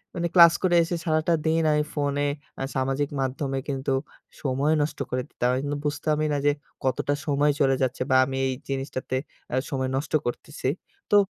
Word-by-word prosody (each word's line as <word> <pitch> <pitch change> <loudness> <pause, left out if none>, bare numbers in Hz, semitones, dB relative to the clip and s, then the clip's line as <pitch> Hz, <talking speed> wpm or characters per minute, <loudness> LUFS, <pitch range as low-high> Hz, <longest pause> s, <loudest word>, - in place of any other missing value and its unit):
মানে 170 0 0
ক্লাস 170 -2 +9
করে 180 -2 +3
এসে 170 +1 -2
সারাটা 155 +1 +2
দিন 160 +1 +3
আমি 150 0 +3
ফোনে 145 -1 0 0.3
আ - - -2
সামাজিক 135 +2 0
মাধ্যমে 135 +1 -2
কিন্তু 135 -1 -2 0.5
সময় 140 +2 +1
নষ্ট 145 - -2
করে 125 - -1
দিতাম 125 - -1
আমি 130 - +1
কিন্তু 145 0 -2
বুঝতামই 155 +1 0
না - - +1
যে, 145 - +6 0.3
কতটা 135 +2 0
সময় 145 0 +3
চলে 135 -2 +4
যাচ্ছে 130 0 0
বা 130 - +4
আমি 135 0 -4
এই 130 - 0 0.2
জিনিসটাতে 135 -1 -3 0.4
আ - - +2
সময় 130 -3 -1
নষ্ট 135 +3 -3
করতেছি। 130 +3 -4 0.4
তো - - +6
145 Hz, 180 wpm, -26 LUFS, 135-155 Hz, 0.5 s, ক্লাস